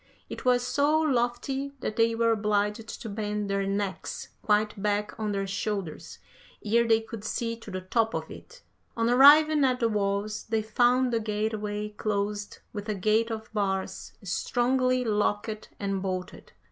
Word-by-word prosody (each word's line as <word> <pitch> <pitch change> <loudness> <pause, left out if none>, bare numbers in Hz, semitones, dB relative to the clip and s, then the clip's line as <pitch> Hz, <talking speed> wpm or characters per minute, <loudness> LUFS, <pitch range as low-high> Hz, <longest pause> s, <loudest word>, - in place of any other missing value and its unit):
It - - -7
was 245 -1 +3
so 290 +4 +2
lofty 270 0 0
that 215 - -3
they 230 0 +3
were 230 0 +3
obliged 210 0 0 0.2
to - - -5
bend 210 -1 -3
their 195 0 0
necks 195 -1 -3
quite 210 -1 +1
back 210 0 0
on 215 -1 -1
their 195 -1 -1
shoulders 195 -3 -4 0.5
ere 235 +2 +3
they 225 0 +4
could 225 -1 -8
see 230 +1 -2
to 225 - -11
the 185 -1 -4
top 225 +4 0
of - - -4
it. - - -13 0.3
On 230 +1 +2
arriving 295 +3 +7
at 255 -1 +2
the 230 -2 +2
walls 205 0 -1
they 220 -1 0
found 245 +3 +2
the 230 - +2
gateway 210 -1 -2
closed 205 -1 -3 0.2
with 210 +1 -6
a 210 - 0
gate 215 +4 +2
of 220 -1 -6
bars 195 -2 -2
strongly 250 +6 +1
locked 210 0 -1
and 195 -1 -2
bolted. 185 -1 -5
215 Hz, 160 wpm, -27 LUFS, 205-240 Hz, 0.5 s, arriving